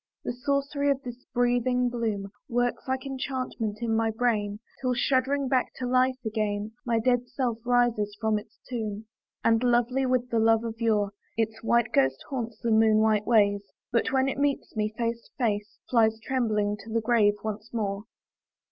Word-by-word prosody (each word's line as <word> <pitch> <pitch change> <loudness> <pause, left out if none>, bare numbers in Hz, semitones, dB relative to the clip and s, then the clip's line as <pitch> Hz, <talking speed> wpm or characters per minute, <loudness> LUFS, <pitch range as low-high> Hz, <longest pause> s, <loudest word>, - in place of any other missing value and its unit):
The - - -2
sorcery 280 +3 0
of 275 -1 0
this 245 0 -8
breathing 245 +1 +2
bloom 220 -5 -2 0.2
Works 245 +2 0
like 260 0 -2
enchantment 255 -5 -3
in 225 -1 +1
my 225 0 +2
brain, 220 -3 0 0.2
Till, 255 -1 +1
shuddering 265 +2 +1
back 255 -1 +1
to 255 - -4
life 255 +1 +2
again, 215 -1 -1 0.2
My 230 -1 +2
dead 245 +2 +2
self 245 -2 -2
rises 235 -4 +2
from 220 -2 +1
its 215 +1 -17
tomb. 220 -3 -4 0.4
And, 225 0 +4
lovely 250 +2 +2
with 250 -1 0
the 230 - +2
love 225 0 +4
of 225 0 -6
yore, 210 -3 +2 0.3
Its 225 0 -1
white 235 0 +2
ghost 135 -1 +2
haunts 235 -4 -3
the 230 - +1
moon 220 0 +5
white 215 -1 +2
ways; 205 -3 +4 0.3
But, 235 - +1
when 265 0 +2
it 270 - -2
meets 285 -3 -1
me 215 0 0
face 230 0 -1
to - - -51
face, 210 -3 -1
Flies 225 -2 +3
trembling 215 -4 0
to 225 - -11
the 230 0 +1
grave 215 -3 +3
once 215 +1 -5
more. 205 -2 -2
230 Hz, 175 wpm, -27 LUFS, 215-250 Hz, 0.4 s, moon